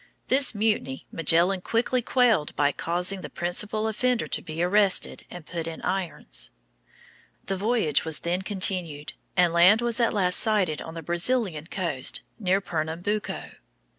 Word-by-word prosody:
This 265 -2 +3
mutiny 205 -11 -1
Magellan 170 +3 +3
quickly 245 +5 0
quelled 235 - +2
by 145 0 +2
causing 180 +5 -2
the - - -7
principal 210 +5 0
offender 245 +2 0
to - - -2
be 160 +2 -4
arrested 195 +1 +2
and 175 -3 -10
put 165 -1 -5
in 165 -1 -6
irons. 190 -3 -3 1.0
The 195 - -2
voyage 210 - +1
was 160 -2 -4
then 175 +2 -1
continued, 185 -7 -2 0.2
and 175 -2 +4
land 180 +6 +6
was 235 0 0
at 235 - +3
last 185 -4 +1
sighted 195 -8 +2
on 160 - -9
the 165 - -7
Brazilian 175 -1 +1
coast, 165 -9 0 0.2
near 190 -2 +2
Pernambuco. 175 +4 -3
185 Hz, 145 wpm, -25 LUFS, 165-215 Hz, 1.0 s, land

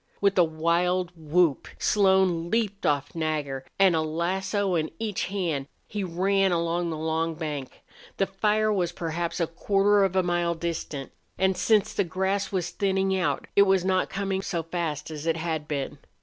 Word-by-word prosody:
With 200 -1 +3
a - - +8
wild 170 +3 +1
whoop 160 -1 +1
Slone 190 -4 +3
leaped 210 -2 0
off 145 -1 0
Nagger, 150 -5 -2
and, 190 -3 +5
a 160 - +2
lasso 185 +5 -1
in 160 -2 0
each 215 -2 -2
hand, 170 -8 -2 0.2
he 205 -2 -3
ran 190 +2 +2
down 170 0 0
the 160 - -3
long 160 +1 -1
bank. 150 -5 -5 0.3
The 195 - +2
fire 210 +2 +1
was 180 -4 0
perhaps 170 0 -3
a 170 - +2
quarter 200 +4 +2
of 190 -1 0
a 185 - +3
mile 175 -1 0
distant, 160 -4 -4 0.3
and, 190 0 +2
since 195 +3 +2
the 200 - +1
grass 190 +4 -1
was 185 -4 -1
thinning 195 -1 +1
out, 185 -2 0
it 200 - +7
was 190 -2 +3
not 185 -1 +1
coming 195 -1 -2
so 170 -4 -2
fast 165 -3 -3
as 155 +1 -6
it 165 0 +2
had 160 -2 -3
been. 140 -3 -3
175 Hz, 175 wpm, -26 LUFS, 160-195 Hz, 0.3 s, a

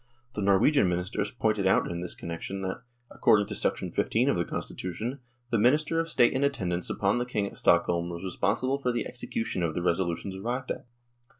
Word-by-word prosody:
The 105 - -3
Norwegian 100 +4 +4
Ministers 90 +3 -1
pointed 110 -5 0
out 95 - +4
in 85 - -4
this 90 0 -4
con - - -8
nection 95 +4 -5
that, 95 +6 -3 0.3
according 100 -1 +4
to - - -1
15 - - +2
of - - +2
the - - 0
Constitution, 110 +9 -4 0.3
the 115 - +2
Minister 150 +8 +3
of 165 0 -1
State 120 -6 +4
in 130 - 0
attendance 90 -11 -1
upon 100 +4 +1
the 120 - -1
King 105 -5 -1
at - - -7
Stockholm 85 0 +3
was 85 +1 -6
responsible 115 +8 0
for 125 -3 0
the 120 - -2
execution 115 -5 -3
of 80 -2 -1
the 90 - -2
resolutions 90 +2 -1
arrived 120 +6 -3
at. - - -6
100 Hz, 195 wpm, -28 LUFS, 90-125 Hz, 0.3 s, Norwegian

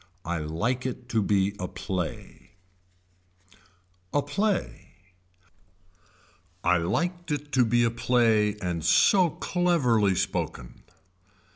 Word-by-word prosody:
I 85 0 -2
LIKE 115 +13 -2
IT 125 -1 -7
TO 115 -3 +1
BE 100 0 +1
A 90 - -3
PLAY 90 -3 -6 1.6
A 145 - +1
PLAY 195 - -2 1.7
I 90 - +3
liked 175 - -2
it 145 0 -3
to 130 -3 +4
be 120 +1 +2
a 115 - +2
play 115 -3 +2
and 85 -3 -2
so 170 - +4
cleverly 130 - +1
spoken. 65 -8 -3
115 Hz, 105 wpm, -26 LUFS, 95-145 Hz, 1.7 s, to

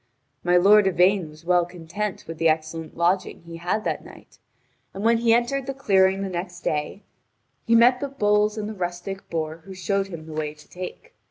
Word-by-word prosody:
My 180 0 +4
lord 200 +2 +6
Yvain 185 -1 +3
was 155 +2 -16
well 180 0 +4
content 180 +4 -5
with 165 0 -8
the 165 0 +4
excellent 160 +1 -3
lodging 175 0 0
he 170 0 -9
had 180 +6 -1
that - - -2
night, - - -16 0.6
and 195 - -5
when 230 0 +4
he 230 -1 +3
entered 245 +3 +1
the 275 - -3
clearing 195 -6 +3
the - - -2
next 175 -1 -5
day, 150 +7 -2 0.6
he 230 - +4
met 245 +2 +6
the 280 - -2
bulls 210 -4 +2
and 210 -1 -3
the 220 - -5
rustic 185 +1 -5
boor 160 -1 -3
who 190 +3 -12
showed 195 +1 -1
him 165 -4 -8
the 160 - -9
way 155 -1 -3
to 150 - -18
take. 185 - -9
185 Hz, 200 wpm, -24 LUFS, 170-210 Hz, 0.6 s, lord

